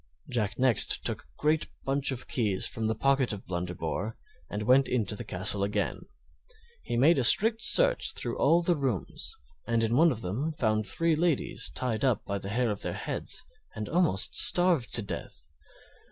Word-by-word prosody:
Jack 105 Hz, -4 st, -1 dB
next 130 Hz, -4 st, +2 dB
took -, -, -1 dB
a -, -, -27 dB
great 155 Hz, +1 st, +1 dB, 0.2 s
bunch 135 Hz, +1 st, 0 dB
of 130 Hz, -2 st, -6 dB
keys 105 Hz, -6 st, 0 dB
from 110 Hz, -1 st, -2 dB
the 110 Hz, -, -1 dB
pocket 135 Hz, +1 st, +1 dB
of 105 Hz, -2 st, -7 dB
Blunderbore 90 Hz, +3 st, -4 dB, 0.3 s
and 105 Hz, +1 st, -4 dB
went 130 Hz, +4 st, +4 dB
into 110 Hz, -4 st, -1 dB
the -, -, -5 dB
castle 95 Hz, +2 st, 0 dB
again. 100 Hz, +1 st, -2 dB, 0.7 s
He 120 Hz, -, -4 dB
made 145 Hz, +5 st, +4 dB
a -, -, +1 dB
strict 220 Hz, -, +5 dB
search -, -, +3 dB
through -, -, -3 dB
all 170 Hz, +1 st, +3 dB
the 175 Hz, 0 st, +2 dB
rooms, 140 Hz, -, -4 dB, 0.3 s
and 115 Hz, -1 st, +1 dB
in 115 Hz, +1 st, +1 dB
one 165 Hz, +4 st, +5 dB
of 115 Hz, -4 st, -4 dB
them 130 Hz, -, -3 dB
found 110 Hz, -7 st, 0 dB
three 165 Hz, -, +1 dB
ladies 165 Hz, -2 st, 0 dB
tied 115 Hz, -4 st, -2 dB
up 125 Hz, -6 st, +1 dB
by 100 Hz, 0 st, -3 dB
the 100 Hz, -, -6 dB
hair 120 Hz, +2 st, 0 dB
of 105 Hz, -, -5 dB
their -, -, -3 dB
heads -, -, -5 dB, 0.3 s
and 105 Hz, -1 st, -5 dB
almost 140 Hz, -, +1 dB
starved 175 Hz, -8 st, +3 dB
to 115 Hz, -, 0 dB
death. -, -, -8 dB
120 Hz, 180 wpm, -28 LUFS, 105-150 Hz, 0.7 s, strict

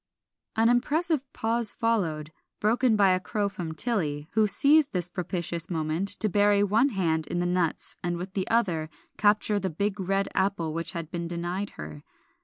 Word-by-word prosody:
An 225 Hz, +1 st, +3 dB
impressive 285 Hz, +4 st, +1 dB
pause 225 Hz, -1 st, +4 dB
followed, 165 Hz, -10 st, -1 dB, 0.3 s
broken 230 Hz, +2 st, +2 dB
by 200 Hz, -2 st, +4 dB
a 185 Hz, -, +2 dB
crow 205 Hz, +3 st, -2 dB
from 170 Hz, -5 st, -6 dB
Tilly, 155 Hz, -8 st, -2 dB
who 215 Hz, 0 st, +3 dB
seized 285 Hz, +7 st, +4 dB
this 180 Hz, -1 st, -1 dB
propitious 170 Hz, -2 st, -3 dB
moment 160 Hz, +2 st, -2 dB
to 215 Hz, -, +3 dB
bury 205 Hz, 0 st, +3 dB
one 220 Hz, +7 st, +3 dB
hand 165 Hz, -, -1 dB
in -, -, -3 dB
the 175 Hz, -, 0 dB
nuts 175 Hz, -2 st, -1 dB
and 175 Hz, 0 st, -1 dB
with 185 Hz, +2 st, -7 dB
the 190 Hz, -2 st, -2 dB
other 175 Hz, -9 st, 0 dB, 0.3 s
capture 210 Hz, 0 st, +3 dB
the 190 Hz, -1 st, -2 dB
big 200 Hz, +5 st, -2 dB
red 195 Hz, +1 st, 0 dB
apple 190 Hz, -5 st, -1 dB
which 165 Hz, +1 st, -4 dB
had 165 Hz, -2 st, -6 dB
been 170 Hz, -1 st, -4 dB
denied 175 Hz, +4 st, -4 dB
her. 75 Hz, -1 st, -8 dB
190 Hz, 175 wpm, -27 LUFS, 170-215 Hz, 0.3 s, pause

